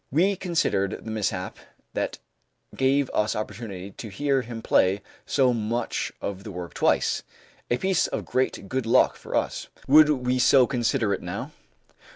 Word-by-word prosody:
We 185 +8 +3
considered 165 - 0
the 110 - -4
mishap 95 -4 -2 0.4
that - - -2 0.6
gave 135 0 +2
us 105 0 +1
opportunity 100 -3 -6
to 110 - -8
hear 135 +6 +1
him 115 -2 -7
play 95 +2 +3 0.2
so 130 -2 +3
much 115 +1 -2
of 100 -1 -5
the 105 - -8
work 90 -3 -7
twice, - - +2 0.5
a 120 - +2
piece 190 +1 +1
of - - -4
great 130 -5 -1
good 130 +1 -2
luck 115 - +4
for - - -7
us. - - -1 0.2
Would 150 +2 +7
we 125 -3 +1
so 130 0 +6
consider 120 -4 0
it - - -3
now? - - -5
120 Hz, 160 wpm, -25 LUFS, 105-135 Hz, 0.6 s, Would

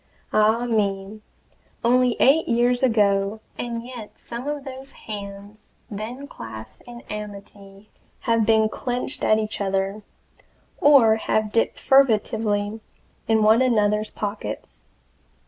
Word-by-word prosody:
Ah 220 +3 +3
me! 205 -2 -1 0.6
only 250 0 +3
eight 295 +5 +4
years 245 +1 +2
ago, 205 -4 +2 0.2
and 235 -1 -5
yet 245 -4 -10
some 240 +3 -7
of 295 -1 -3
those 270 0 -9
hands 205 0 -9 0.2
then 225 +7 -6
clasped 110 - -10
in 240 0 -10
amity 200 -1 -10 0.3
have 230 -1 +2
been 220 0 +4
clenched 245 +4 -4
at 215 - +4
each 215 -1 -3
other, 195 +1 -1 0.8
or 250 -7 +6
have 215 -1 0
dipped 230 - +1
furtively 220 -4 +2 0.5
in 220 -1 +3
one 220 +3 +5
another's 215 -4 +2
pockets. 205 0 -6
220 Hz, 115 wpm, -23 LUFS, 205-240 Hz, 0.8 s, or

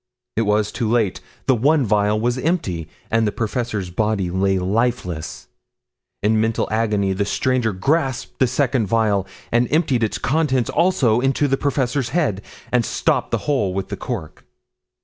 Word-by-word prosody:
It 115 -1 +1
was 105 0 +2
too 115 -3 -2
late, 110 -5 +1 0.2
the 130 - +4
one 140 +4 +3
vial 105 0 +2
was 120 +3 0
empty, 100 - -1 0.2
and 115 -1 +2
the - - 0
professor's 110 -4 -3
body 100 -2 0
lay 95 +1 +1
lifeless. 95 -4 -2 0.8
In 110 +1 +3
mental 110 0 0
agony 105 -3 +1
the 100 +2 0
stranger 125 +2 0
grasped 135 - -1
the 130 - +4
second 130 -3 +1
vial 105 -3 +1 0.2
and 120 0 +2
emptied 140 -6 +2
its 110 - 0
contents 135 -4 +1
also 130 -11 +3
into 135 +3 +1
the 135 - +2
professor's 135 -2 -1
head, 140 - 0 0.3
and 125 -1 +3
stopped - - 0
the - - -2
hole 105 -11 0
with 95 -1 -3
the - - -3
cork. 80 -1 -6
115 Hz, 160 wpm, -21 LUFS, 100-130 Hz, 0.8 s, the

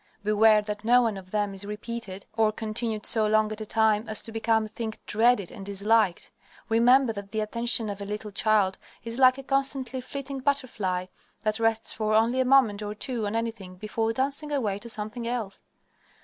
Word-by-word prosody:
Beware 215 0 +4
that 210 0 -5
no 245 +2 +5
one 225 -3 0
of 190 -1 -10
them 205 0 -1
is 195 0 -5
repeated 210 -1 -6
or 220 -1 +3
continued 220 0 -3
so 220 -2 +4
long 215 0 +2
at 215 0 -6
a 215 - -5
time 220 0 +2
as 215 - +2
to 225 - -4
become 225 0 +1
a - - -6
thing 220 +1 -5
dreaded 225 -3 +2
and 195 - -9
disliked. 200 -1 +1 0.4
Remember 240 +2 +4
that 200 -1 -8
the 220 - -3
attention 235 +1 +1
of 200 -1 -5
a - - -4
little 210 +1 -5
child 200 -2 +2 0.2
is 230 +2 -5
like 255 0 +6
a 270 - -8
constantly 270 -2 -1
flitting 275 +1 -6
butterfly 235 -10 -1 0.4
that 215 0 -1
rests 225 0 0
for 215 -1 0
only 230 +4 +3
a 260 - +2
moment 250 -6 +4
or 210 0 -5
two 230 -1 -3
on 205 - -3
anything 225 -5 -4
before 225 +3 -2
dancing 275 +4 -2
away 215 -9 -1
to 235 - -7
something 220 +2 -2
else. 230 -5 -4
220 Hz, 195 wpm, -26 LUFS, 210-235 Hz, 0.4 s, like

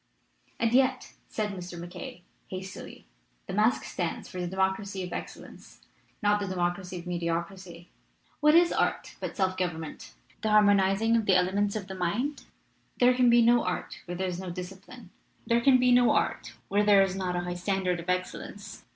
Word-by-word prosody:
"And 230 -2 +2
yet,'* 260 0 +2
said 210 -2 -2
Mr. 180 -2 -7
MacKaye, 175 +5 -8 0.2
hastily, 190 0 -8 0.4
"the 190 - -6
masque 215 +5 +2
stands 175 -3 -4
for 180 - -6
the 175 - -2
democracy 190 +1 -1
of 180 -1 -6
excellence, - - -9 0.4
not 205 0 +3
the 200 - -3
democracy 180 0 -2
of 170 - -8
mediocrity. 170 0 -4 0.5
What 300 +1 +5
is 345 0 +5
art - - -1
but - - -6
self 185 -2 0
government, 165 -4 -5 0.3
the 220 - 0
harmonizing 205 +1 +4
of 225 -2 0
the 190 - +5
ele 180 0 +3
ments 205 +1 0
of 210 -3 -3
the 190 - -6
mind? 205 +11 -2 0.5
There 250 0 +5
can 250 -1 +4
be 235 0 +6
no 240 +1 +4
art 180 0 -4
where 175 0 -5
there 190 +1 -1
is 180 -1 -4
no 190 -1 -6
discipline, 190 +4 -9 0.3
there 235 0 +2
can 260 +1 +6
be 250 0 +3
no 245 -1 +5
art - - -1
where 205 +1 +2
there 205 -2 +6
is 190 -1 -2
not 185 -2 -2
a 175 - 0
high 175 0 -4
standard 180 0 -1
of 170 - -7
excellence. 195 +2 -4
190 Hz, 185 wpm, -28 LUFS, 180-220 Hz, 0.5 s, be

